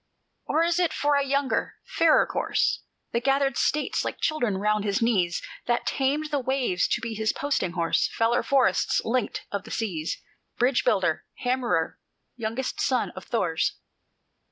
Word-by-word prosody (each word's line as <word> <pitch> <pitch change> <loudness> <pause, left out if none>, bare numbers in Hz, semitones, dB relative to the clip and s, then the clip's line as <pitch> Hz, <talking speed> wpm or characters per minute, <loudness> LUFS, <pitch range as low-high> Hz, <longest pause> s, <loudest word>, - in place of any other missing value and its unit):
"Or 320 - +2
is 340 +1 +1
it 350 -2 +2
for 290 0 +1
a 280 0 +3
younger, 275 0 0
fairer 330 -2 +4
corse, - - 0 0.3
That 235 +1 -1
gathered 275 -1 +2
States 300 +4 0
like - - -4
children 245 -11 0
round 210 +1 +1
his 200 -1 0
knees, 190 -7 +1 0.2
That 240 0 +1
tamed 290 +3 0
the 290 - +1
waves 255 -8 0
to 235 - 0
be 230 0 -4
his 220 0 0
posting 275 -11 -1
horse, 165 -1 +1
Feller 230 +1 +2
of - - -5
forests, 275 -2 +3
linker 240 -1 -1
of 200 -2 -3
the - - -12
seas, 175 -8 -2 0.4
Bridge 245 +1 +2
builder, 175 -5 +1 0.2
hammerer, 245 -10 0 0.4
youngest 235 +2 -3
son - - +1
of - - -10
Thor's? - - 0
240 Hz, 160 wpm, -26 LUFS, 210-275 Hz, 0.4 s, fairer